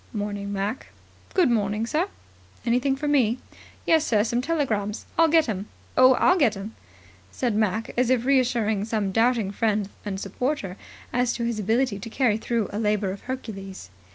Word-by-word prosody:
"Morning, 205 -1 -3
Mac." 205 +5 -3 0.5
"Good 345 -9 +4
morning, 210 -1 0
sir." 315 +9 0 0.6
"Anything 250 +3 +2
for 295 +2 -4
me?" 255 -5 +3 0.5
"Yes, 320 -2 +4
sir. 215 -8 +2
Some 240 +2 0
telegrams. 235 -9 -1
I'll 330 - +5
get 320 -1 +4
'em. 205 -2 -3 0.3
Oh, 255 0 +7
I'll 365 +7 +4
get 230 -9 +3
'em," 205 +3 -7 0.6
said 245 -3 -1
Mac, 215 +1 0
as 250 0 +2
if 250 -2 +2
reassuring 240 -6 +2
some 215 -3 -1
doubting 225 -1 +2
friend 210 -1 0
and 195 -2 -4
supporter 200 -1 -3 0.4
as 245 0 +1
to 235 - -3
his 235 -2 -1
ability 220 +1 +1
to 215 - -7
carry 230 -3 +2
through 230 -3 -1
a 205 - -2
labour 210 -3 +1
of 195 - -7
Hercules. 195 - -6
225 Hz, 170 wpm, -25 LUFS, 205-255 Hz, 0.6 s, Oh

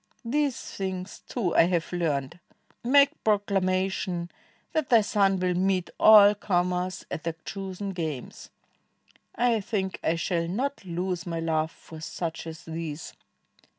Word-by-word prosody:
"These 280 +2 0
things, 190 -1 -5
too. 205 -9 -1
I 165 - +6
have 175 -1 -1
learned; 155 -3 -1 0.4
Make 280 +4 +4
proclamation 190 -3 0 0.4
that 310 -4 0
thy 230 -3 +7
son 200 -2 +2
will 180 0 +1
meet 185 0 0
AU 210 -1 +9
comers 180 -2 -1
at 155 - -4
their 165 -1 -2
chosen 195 +1 -5
games. 160 -8 -5 0.9
I 240 -2 +2
think 195 -3 -2
I 165 - +2
shall 170 0 -1
not 260 +10 -2
lose 180 0 -3
my 165 -1 -2
love 160 -1 0
for 160 -1 -13
such 165 0 -4
as 160 0 -9
these."' 160 -1 -5
185 Hz, 135 wpm, -27 LUFS, 170-205 Hz, 0.9 s, AU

